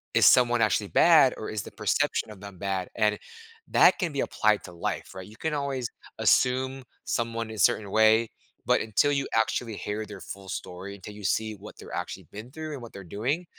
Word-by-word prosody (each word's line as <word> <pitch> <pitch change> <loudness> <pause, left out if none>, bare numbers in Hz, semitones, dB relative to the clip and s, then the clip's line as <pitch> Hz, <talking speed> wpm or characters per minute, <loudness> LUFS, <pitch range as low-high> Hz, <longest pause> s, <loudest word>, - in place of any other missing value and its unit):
is - - +6
someone 120 -2 +6
actually 110 - +2
bad - - +6
or - - -5
is - - -3
the - - -10
perception 110 - 0
of 95 - -12
them 100 -2 -10
bad? 95 -2 -2
And 105 -1 +2 0.5
that - - +5
can 175 -5 -1
be 140 - -1
applied 105 -1 +1
to 90 - -10
life, 85 - -4
right? 95 -1 -8
You 110 +2 -15
can 160 -1 -2
always 140 -4 -2 0.3
assume 130 +1 +2 0.2
someone 115 -1 -2
is 110 -4 -3
a - - +6
certain 100 -3 0
way, 110 +1 +4 0.4
but - - +3
until 110 +7 +2
you 140 -1 0
actually 110 0 0
hear 105 +1 -4
their 100 -2 -9
full 95 -1 -9
story, 95 +3 -6
until 100 +2 -10
you 105 0 -11
see 110 +3 0
what 100 +2 -12
they're - - -11
actually - - -5
been 110 +5 -9
through 155 +1 -6
and 135 - -7
what 115 - -10
they're 100 - -9
doing, 125 - -2
110 Hz, 210 wpm, -27 LUFS, 100-125 Hz, 0.5 s, is